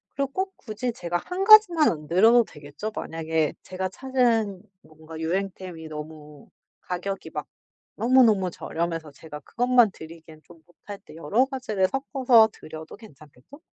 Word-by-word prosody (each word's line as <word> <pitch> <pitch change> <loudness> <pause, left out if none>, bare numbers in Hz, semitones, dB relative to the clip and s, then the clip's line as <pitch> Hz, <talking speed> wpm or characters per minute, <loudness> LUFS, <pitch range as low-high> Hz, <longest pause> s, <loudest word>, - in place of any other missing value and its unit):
그리고 275 0 -2
꼭 380 +4 -3
굳이 240 +1 -5
제가 175 -4 -3
1 360 - -4
가지만 390 -7 +7
안 150 -2 -7
드려도 225 +8 +5
되겠죠? 150 +8 -8
만약에 160 -1 -2
제가 185 0 -4
찾은 230 -5 0 0.2
뭔가 160 +1 -12
유행템이 180 -1 -4
너무 150 -1 -10 0.3
가격이 195 +2 -5
막 - - -4 0.5
너무너무 225 -6 +4
저렴해서 165 -2 -4
제가 150 +1 -11
그것만 245 - +2
드리기엔 160 -2 -13
좀 170 -1 -17 0.3
뭣할 205 -1 -7
때 - - -14
여러 195 +11 +1
가지를 240 -8 -1
섞어서 260 -4 +3
드려도 155 0 -10
괜찮겠죠? 155 - -17
185 Hz, 320 characters per minute, -25 LUFS, 160-245 Hz, 0.5 s, 가지만